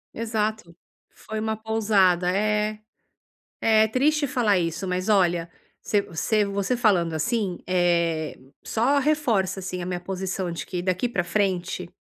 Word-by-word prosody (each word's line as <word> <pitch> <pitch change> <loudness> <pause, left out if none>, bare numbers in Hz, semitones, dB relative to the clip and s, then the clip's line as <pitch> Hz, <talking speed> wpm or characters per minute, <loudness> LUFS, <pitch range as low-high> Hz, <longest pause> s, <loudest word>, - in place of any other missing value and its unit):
Exato, 220 -5 -2 0.3
foi 220 0 -7
uma 220 0 -2
pousada 205 -5 +2
é, 210 +1 0 0.8
é 220 -1 +4
triste 290 +5 +2
falar 225 -7 +2
isso, 170 +2 -2
mas 185 +3 -2
olha, 175 -4 +2 0.3
você 205 +1 0
você 200 +4 -1
falando, 185 -8 +2
assim, 185 +4 -1
eh, 170 -3 +1 0.2
só 275 +6 +1
reforça 230 -11 +1
assim 180 -1 -4
a - - -5
minha 180 -1 -2
posição 185 -1 -3
de 165 - -5
que 180 -2 -4
daqui 185 +6 0
pra 180 -7 -1
frente 185 -3 -1
195 Hz, 135 wpm, -24 LUFS, 180-220 Hz, 0.8 s, é